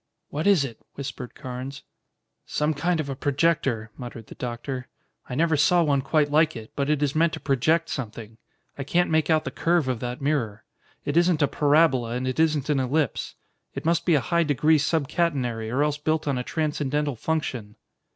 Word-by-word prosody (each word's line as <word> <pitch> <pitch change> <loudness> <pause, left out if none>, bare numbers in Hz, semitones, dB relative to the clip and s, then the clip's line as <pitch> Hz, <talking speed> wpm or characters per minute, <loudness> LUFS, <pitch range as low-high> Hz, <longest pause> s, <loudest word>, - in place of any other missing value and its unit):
"What 155 +6 -1
is 190 -9 +5
it?" 115 -5 -8 0.2
whispered 135 -3 -6
Carnes. 130 +2 -7 0.6
"Some 150 +1 0
kind 170 +3 0
of 155 - -2
a 135 - -3
projector," 140 -6 0
muttered 120 -3 -8
the - - -11
doctor. 125 +2 -5 0.4
"I 125 - -3
never 160 +2 +2
saw 160 +4 +4
one 140 -3 +2
quite 145 +2 +1
like 155 0 +3
it, 110 -1 -9
but 140 0 -1
it 150 -1 +2
is 145 -1 +1
meant 160 +1 +2
to - - -4
project 155 +5 +1
something. 115 -3 -6 0.4
I - - -1
can't 175 +6 +1
make 155 -1 +2
out 155 -1 +3
the - - -4
curve 170 -4 +1
of 125 -3 -1
that 125 +1 -4
mirror. 125 -7 -1 0.4
It 145 +3 0
isn't 170 -3 +4
a - - +4
parabola 145 -6 +3
and 125 +1 -2
it 130 +3 -2
isn't 155 -3 +2
an 145 -3 +2
ellipse. 135 +1 -1 0.4
It - - -5
must 170 0 +2
be 170 -2 +3
a 145 - +3
high 170 +3 +1
degree 150 +1 +3
subcatenary 140 -7 0
or 135 +4 +2
else 150 0 0
built 155 0 0
on 135 -3 0
a - - -2
transcendental 150 -2 -1
function." 120 -6 -3
145 Hz, 195 wpm, -25 LUFS, 125-160 Hz, 0.6 s, is